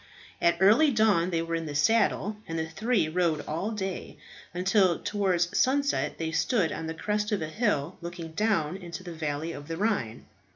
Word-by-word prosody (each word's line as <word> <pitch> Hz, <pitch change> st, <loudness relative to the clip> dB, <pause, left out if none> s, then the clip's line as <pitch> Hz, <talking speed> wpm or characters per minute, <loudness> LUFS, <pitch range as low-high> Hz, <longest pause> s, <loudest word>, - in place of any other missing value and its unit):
At 170 Hz, 0 st, +3 dB
early 220 Hz, -, +6 dB
dawn 215 Hz, -8 st, +3 dB
they 165 Hz, -2 st, 0 dB
were 165 Hz, 0 st, -5 dB
in 165 Hz, -1 st, -2 dB
the 145 Hz, -, -5 dB
saddle, 210 Hz, +4 st, +2 dB
and 165 Hz, -, -4 dB
the 160 Hz, 0 st, -2 dB
three 215 Hz, +2 st, 0 dB
rode 165 Hz, -2 st, +1 dB
all 170 Hz, +7 st, -2 dB
day, 195 Hz, -4 st, -5 dB, 0.3 s
until 185 Hz, 0 st, +2 dB
towards 185 Hz, -4 st, 0 dB
sunset 280 Hz, +2 st, +1 dB
they 160 Hz, -1 st, -3 dB
stood 165 Hz, +3 st, +1 dB
on 160 Hz, -, -4 dB
the 160 Hz, -, -4 dB
crest 210 Hz, +3 st, -1 dB
of 205 Hz, -6 st, 0 dB
a 155 Hz, -, -4 dB
hill 175 Hz, -, -1 dB
looking 170 Hz, -1 st, -7 dB
down 190 Hz, -3 st, 0 dB
into 175 Hz, -1 st, -8 dB
the 175 Hz, -2 st, -7 dB
valley 155 Hz, 0 st, -3 dB
of 145 Hz, -3 st, -9 dB
the 165 Hz, 0 st, -4 dB
Rhine. 180 Hz, -, -1 dB
175 Hz, 190 wpm, -28 LUFS, 160-210 Hz, 0.3 s, early